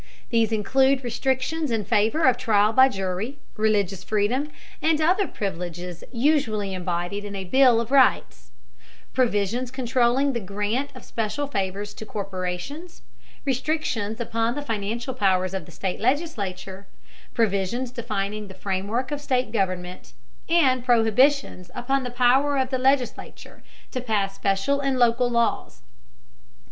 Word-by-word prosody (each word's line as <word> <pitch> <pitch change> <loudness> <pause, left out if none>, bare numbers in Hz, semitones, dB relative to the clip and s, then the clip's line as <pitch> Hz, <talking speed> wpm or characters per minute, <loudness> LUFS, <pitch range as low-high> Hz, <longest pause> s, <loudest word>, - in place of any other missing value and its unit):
These 225 -2 +2
include 265 +5 +2
restrictions 265 +5 -1
in 225 -3 -1
favor 225 +10 +2
of 260 -3 +5
trial 215 -3 +2
by 260 +3 +7
jury, 195 +5 -3 0.2
religious 205 -4 +1
freedom, 220 +9 0 0.3
and 315 -1 +2
other 365 +6 +2
privileges 175 -2 -5
usually 230 -7 +1
embodied 180 +2 -3
in 205 -1 -6
a 195 - -4
bill 250 +4 +5
of 230 +2 -4
rights; 255 - +3 0.6
provisions 235 0 0
controlling 255 +1 +1
the 235 - -1
grant 210 +7 -2
of 255 - -11
special 225 +6 -2
favors 200 -5 -3
to - - -8
corporations; 195 - -5 0.4
restrictions 255 -6 -1
upon 230 0 -1
the 290 - -4
financial 230 +1 -3
powers 190 -5 +1
of 190 -4 -4
the - - -13
state 180 +3 -4
legislature; 200 - -2 0.5
provisions 225 +3 0
defining 210 -3 -3
the 190 - -11
framework 200 +7 -2
of 290 -1 -3
state 255 -5 0
government; 185 -4 -3 0.4
and 265 -7 +3
prohibitions 240 -4 +2
upon 270 +3 0
the 250 - -4
power 255 +4 +3
of 260 0 0
the 260 - 0
legislature 265 -1 -1 0.3
to 255 - -3
pass 205 -5 0
special 195 +9 0
and 275 -2 0
local 245 0 +3
laws. 235 - -1
230 Hz, 135 wpm, -24 LUFS, 200-260 Hz, 0.6 s, by